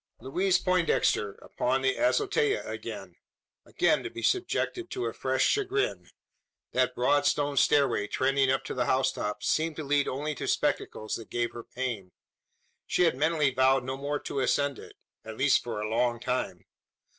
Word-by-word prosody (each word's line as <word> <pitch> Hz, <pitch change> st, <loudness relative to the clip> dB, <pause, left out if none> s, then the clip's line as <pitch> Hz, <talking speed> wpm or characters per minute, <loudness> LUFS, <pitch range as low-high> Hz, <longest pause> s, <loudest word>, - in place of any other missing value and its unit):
Louise 180 Hz, +9 st, +1 dB
Poindexter 175 Hz, -, +1 dB
upon 130 Hz, +2 st, -1 dB
the 130 Hz, 0 st, +2 dB
azotea 415 Hz, +7 st, +1 dB
again -, -, -7 dB, 0.5 s
again -, -, +2 dB
to -, -, -5 dB
be -, -, -8 dB
subjected 360 Hz, -1 st, 0 dB
to 380 Hz, -1 st, -3 dB
a -, -, -2 dB
fresh -, -, 0 dB
chagrin! 410 Hz, 0 st, 0 dB, 0.6 s
That 130 Hz, 0 st, +1 dB
broad 145 Hz, +3 st, +2 dB
stone 145 Hz, -1 st, +1 dB
stairway 130 Hz, -6 st, +3 dB
trending 135 Hz, +3 st, +1 dB
up 135 Hz, 0 st, +1 dB
to -, -, -5 dB
the 125 Hz, -1 st, 0 dB
housetop, 105 Hz, -5 st, 0 dB
seemed 160 Hz, 0 st, +1 dB
to 155 Hz, -, -5 dB
lead 145 Hz, 0 st, +1 dB
only 150 Hz, +3 st, -2 dB
to -, -, -5 dB
spectacles 110 Hz, -, -1 dB
that 115 Hz, -, -11 dB
gave 120 Hz, 0 st, -1 dB
her 120 Hz, -, -8 dB
pain. 115 Hz, -9 st, -5 dB, 0.7 s
She -, -, +2 dB
had 165 Hz, -6 st, +3 dB
mentally 150 Hz, -1 st, +1 dB
vowed 130 Hz, 0 st, +3 dB
no 130 Hz, +1 st, -3 dB
more 140 Hz, +2 st, -2 dB
to 140 Hz, -, -4 dB
ascend 140 Hz, +1 st, +1 dB
it -, -, -12 dB, 0.3 s
at 110 Hz, 0 st, -8 dB
least 140 Hz, +1 st, +3 dB
for 115 Hz, -3 st, -4 dB
a 105 Hz, -, -2 dB
long 120 Hz, +1 st, 0 dB
time. 125 Hz, +1 st, -3 dB
135 Hz, 170 wpm, -28 LUFS, 125-155 Hz, 0.7 s, stairway